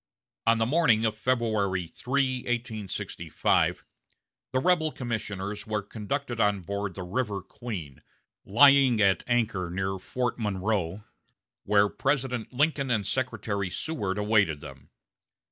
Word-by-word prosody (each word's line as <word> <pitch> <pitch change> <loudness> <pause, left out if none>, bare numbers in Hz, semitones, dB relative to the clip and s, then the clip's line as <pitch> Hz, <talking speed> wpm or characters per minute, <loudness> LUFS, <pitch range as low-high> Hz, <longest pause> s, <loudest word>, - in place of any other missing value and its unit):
On 115 0 +5
the 115 - +2
morning 120 -5 +3
of 110 -1 0
February 110 -6 0
3, 130 +7 0
1865, 120 -5 -1 0.7
the 130 - 0
rebel 160 +2 +2
commissioners 105 -5 -4
were 105 -1 -1
conducted 120 +4 -4
on 105 -3 +2
board 100 +1 -4
the 95 - -5
River 100 0 -2
Queen, 90 - -7 0.4
lying 135 +1 +6
at 100 -2 +4
anchor 115 -7 0
near 95 +2 -2
Fort 120 +6 -2
Monroe, 100 -2 -1 0.6
where 105 0 +4
President 125 +2 -1
Lincoln 140 0 +1
and 110 -5 +1
Secretary 105 -4 -2
Seward 105 - -3
awaited 105 -7 +2
them. 70 -2 -12
110 Hz, 120 wpm, -27 LUFS, 100-125 Hz, 0.7 s, lying